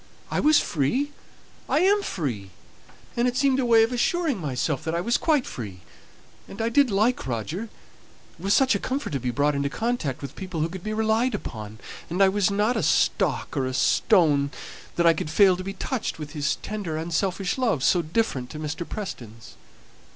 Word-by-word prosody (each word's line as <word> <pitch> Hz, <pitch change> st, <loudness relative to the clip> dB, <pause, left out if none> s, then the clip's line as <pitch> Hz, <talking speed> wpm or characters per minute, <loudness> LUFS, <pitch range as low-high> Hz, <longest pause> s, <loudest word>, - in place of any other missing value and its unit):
"I -, -, 0 dB
was 305 Hz, 0 st, +5 dB
free 245 Hz, -, 0 dB, 0.6 s
I 305 Hz, -, +3 dB
am 405 Hz, +3 st, +4 dB
free; 125 Hz, -, -4 dB, 0.7 s
it 245 Hz, +1 st, +1 dB
seemed 270 Hz, 0 st, +3 dB
a 250 Hz, -, +1 dB
way 225 Hz, -1 st, +6 dB
of 225 Hz, -, 0 dB
assuring 315 Hz, -, 0 dB
myself 140 Hz, -1 st, -2 dB
that 160 Hz, +1 st, -2 dB
I -, -, 0 dB
was 235 Hz, +6 st, +1 dB
quite 300 Hz, -5 st, +2 dB
free; 100 Hz, -7 st, -7 dB, 0.7 s
and 195 Hz, -, -11 dB
I 225 Hz, +1 st, +1 dB
did 275 Hz, +2 st, +4 dB
like 215 Hz, -, +1 dB
Roger 130 Hz, -, -3 dB
it -, -, -15 dB, 0.7 s
was 195 Hz, +1 st, +3 dB
such 265 Hz, -2 st, +4 dB
a 200 Hz, -, 0 dB
comfort 270 Hz, +7 st, -3 dB
to 140 Hz, -, -1 dB
be 125 Hz, 0 st, -2 dB
brought 145 Hz, +5 st, +1 dB
into 140 Hz, 0 st, -1 dB
contact 220 Hz, -, -2 dB
with 140 Hz, -, -7 dB
people 185 Hz, -4 st, -5 dB
who 160 Hz, -, 0 dB
could 185 Hz, 0 st, -8 dB
be 215 Hz, -, -3 dB
relied 220 Hz, +3 st, +1 dB
upon; 110 Hz, -2 st, -7 dB, 0.3 s
and 180 Hz, +4 st, +2 dB
I 190 Hz, -, +6 dB
was 200 Hz, 0 st, +2 dB
not 210 Hz, +4 st, +1 dB
a 220 Hz, -, 0 dB
stock 155 Hz, -, +1 dB
or 130 Hz, -1 st, 0 dB
a 130 Hz, -, -3 dB
stone 150 Hz, -5 st, +3 dB, 0.5 s
that 170 Hz, -, +1 dB
I 165 Hz, -, +7 dB
could 155 Hz, -, -4 dB
fail 190 Hz, +3 st, +5 dB
to 185 Hz, -, -6 dB
be 195 Hz, +1 st, -5 dB
touched 250 Hz, -2 st, -3 dB
with 150 Hz, -2 st, -7 dB
his 145 Hz, -2 st, -1 dB
tender, 200 Hz, -7 st, -4 dB
unselfish 180 Hz, +6 st, -1 dB
love, 225 Hz, -, +1 dB
so 175 Hz, -, +4 dB
different 155 Hz, -, -1 dB
to 155 Hz, -, -8 dB
Mr. 155 Hz, +2 st, -4 dB
Preston's. 115 Hz, -, -7 dB
185 Hz, 195 wpm, -25 LUFS, 145-230 Hz, 0.7 s, I